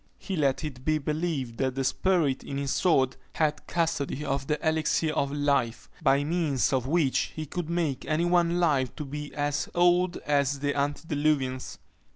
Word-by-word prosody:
He 195 Hz, -, -5 dB
let 140 Hz, -3 st, +1 dB
it 130 Hz, -5 st, -6 dB
be 155 Hz, +2 st, +2 dB
believed 150 Hz, -5 st, -2 dB
that 130 Hz, -1 st, 0 dB
the 135 Hz, -, -1 dB
spirit 160 Hz, -2 st, +1 dB
in 140 Hz, -, -5 dB
his 140 Hz, -1 st, -2 dB
sword 135 Hz, -8 st, +2 dB, 0.2 s
had 150 Hz, -2 st, 0 dB
custody 150 Hz, -3 st, -1 dB
of 135 Hz, 0 st, -2 dB
the 150 Hz, -, +1 dB
elixir 160 Hz, 0 st, +1 dB
of 140 Hz, -2 st, 0 dB
life, 140 Hz, -5 st, 0 dB
by 140 Hz, +1 st, +3 dB
means 150 Hz, -4 st, +1 dB
of 130 Hz, -1 st, 0 dB
which 150 Hz, -3 st, +1 dB
he 155 Hz, -, -4 dB
could 170 Hz, +2 st, -5 dB
make 165 Hz, -6 st, -1 dB
any 155 Hz, +2 st, +1 dB
one 175 Hz, 0 st, +2 dB
live 140 Hz, -7 st, +1 dB
to 150 Hz, -, -5 dB
be 145 Hz, +1 st, -6 dB
as 145 Hz, 0 st, -1 dB
old 175 Hz, +1 st, +3 dB
as 140 Hz, -1 st, +2 dB
the 145 Hz, +1 st, -1 dB
antediluvians. 145 Hz, -2 st, -1 dB
145 Hz, 175 wpm, -27 LUFS, 135-160 Hz, 0.2 s, by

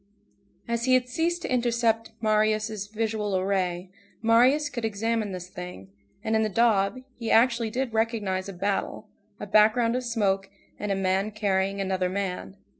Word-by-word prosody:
As 235 Hz, 0 st, -1 dB
he 255 Hz, 0 st, +5 dB
had 250 Hz, -1 st, +1 dB
ceased 335 Hz, +6 st, -1 dB
to -, -, -2 dB
intercept 235 Hz, -2 st, +1 dB
Marius' 215 Hz, -1 st, +1 dB
visual 210 Hz, -3 st, -1 dB
ray, 185 Hz, -2 st, -1 dB, 0.3 s
Marius 250 Hz, +7 st, +4 dB
could 250 Hz, -5 st, -5 dB
examine 220 Hz, 0 st, -1 dB
this 180 Hz, -1 st, -6 dB
thing, 180 Hz, -, -9 dB, 0.3 s
and 220 Hz, -, 0 dB
in 220 Hz, -, +3 dB
the 215 Hz, -, +1 dB
daub, 215 Hz, +1 st, +2 dB, 0.2 s
he 230 Hz, -, -3 dB
actually 235 Hz, -1 st, +3 dB
did 245 Hz, +1 st, -2 dB
recognize 210 Hz, -4 st, -1 dB
a -, -, -6 dB
battle, 195 Hz, +2 st, -2 dB, 0.3 s
a -, -, -5 dB
background 220 Hz, +3 st, +4 dB
of 255 Hz, -, -1 dB
smoke, 200 Hz, -5 st, 0 dB, 0.3 s
and 210 Hz, -1 st, -2 dB
a -, -, +1 dB
man 195 Hz, +1 st, 0 dB
carrying 200 Hz, -2 st, 0 dB
another 190 Hz, -1 st, 0 dB
man. 180 Hz, -, -4 dB
215 Hz, 160 wpm, -26 LUFS, 195-230 Hz, 0.3 s, he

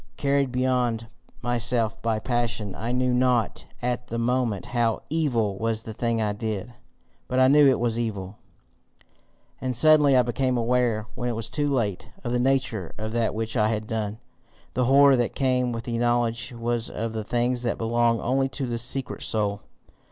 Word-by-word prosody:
Carried 140 Hz, -2 st, +1 dB
beyond 125 Hz, -3 st, 0 dB, 0.4 s
myself 120 Hz, -2 st, 0 dB
by 115 Hz, -1 st, 0 dB
passion, 115 Hz, -3 st, -2 dB
I 115 Hz, +2 st, -4 dB
knew 125 Hz, 0 st, +1 dB
not 125 Hz, -2 st, +1 dB, 0.2 s
at 125 Hz, 0 st, -2 dB
the 115 Hz, -, -4 dB
moment 120 Hz, -3 st, 0 dB
HOW 115 Hz, -2 st, +1 dB
evil 115 Hz, -11 st, 0 dB
was 115 Hz, 0 st, -1 dB
the 110 Hz, -, -7 dB
thing 115 Hz, +1 st, -1 dB
I 105 Hz, -2 st, 0 dB
did. 110 Hz, +1 st, -4 dB, 0.5 s
But 130 Hz, -, -2 dB
I 130 Hz, 0 st, +6 dB
knew 145 Hz, +1 st, +6 dB
it 130 Hz, -, +3 dB
was 120 Hz, -1 st, 0 dB
evil. 100 Hz, -4 st, -4 dB, 1.2 s
And 130 Hz, -2 st, -1 dB
suddenly 150 Hz, -2 st, +6 dB
I 125 Hz, -, +5 dB
became 125 Hz, +1 st, 0 dB
aware, 120 Hz, -2 st, +1 dB
when 125 Hz, 0 st, -3 dB
it 120 Hz, -, -2 dB
was 115 Hz, 0 st, -5 dB
too 145 Hz, -1 st, 0 dB
late, 105 Hz, -8 st, -1 dB
of 120 Hz, -, -3 dB
the 125 Hz, -, +1 dB
nature 130 Hz, -7 st, 0 dB
of 110 Hz, 0 st, -4 dB
that 115 Hz, -2 st, 0 dB
which 110 Hz, +1 st, -3 dB
I 105 Hz, -3 st, +3 dB
had 110 Hz, -1 st, -2 dB
done. 110 Hz, -1 st, -3 dB, 0.6 s
The 125 Hz, -, +1 dB
horror 140 Hz, +1 st, +6 dB
that 120 Hz, -1 st, -1 dB
came 125 Hz, -2 st, +1 dB
with 115 Hz, -1 st, -4 dB
the 115 Hz, -1 st, -3 dB
knowledge 120 Hz, -1 st, 0 dB
was 120 Hz, 0 st, -2 dB
of 115 Hz, 0 st, -4 dB
the 110 Hz, -1 st, -3 dB
things 120 Hz, +2 st, 0 dB
that 120 Hz, -1 st, -1 dB
belong 115 Hz, 0 st, +1 dB
only 135 Hz, +2 st, +1 dB
to 135 Hz, 0 st, -4 dB
the 120 Hz, -1 st, -3 dB
secret 130 Hz, +2 st, -2 dB
soul. 105 Hz, -2 st, 0 dB
120 Hz, 180 wpm, -25 LUFS, 115-125 Hz, 1.2 s, I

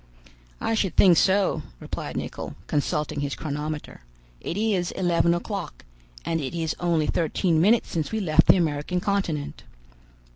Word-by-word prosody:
"I -, -, -1 dB
should 195 Hz, -6 st, 0 dB
think 180 Hz, -3 st, +7 dB
so," 190 Hz, +3 st, +3 dB, 0.2 s
replied -, -, -5 dB
Nicholl, -, -, -5 dB
consulting 150 Hz, +1 st, -1 dB
his 145 Hz, -1 st, -2 dB
chronometer; 150 Hz, -, -5 dB, 0.4 s
"it 170 Hz, -, -4 dB
is 205 Hz, -5 st, +1 dB
eleven 170 Hz, -2 st, +2 dB
o'clock, 180 Hz, -, -5 dB, 0.4 s
and 165 Hz, -1 st, -1 dB
it 140 Hz, +4 st, -4 dB
is 165 Hz, -2 st, -1 dB
only 170 Hz, -3 st, +1 dB
thirteen 165 Hz, +1 st, +1 dB
minutes 215 Hz, +5 st, +3 dB
since 160 Hz, -3 st, -2 dB
we 220 Hz, -, -1 dB
left 160 Hz, -7 st, +3 dB
the -, -, +7 dB
American 160 Hz, +1 st, -1 dB
continent." 175 Hz, -7 st, -2 dB
170 Hz, 145 wpm, -25 LUFS, 155-190 Hz, 0.4 s, think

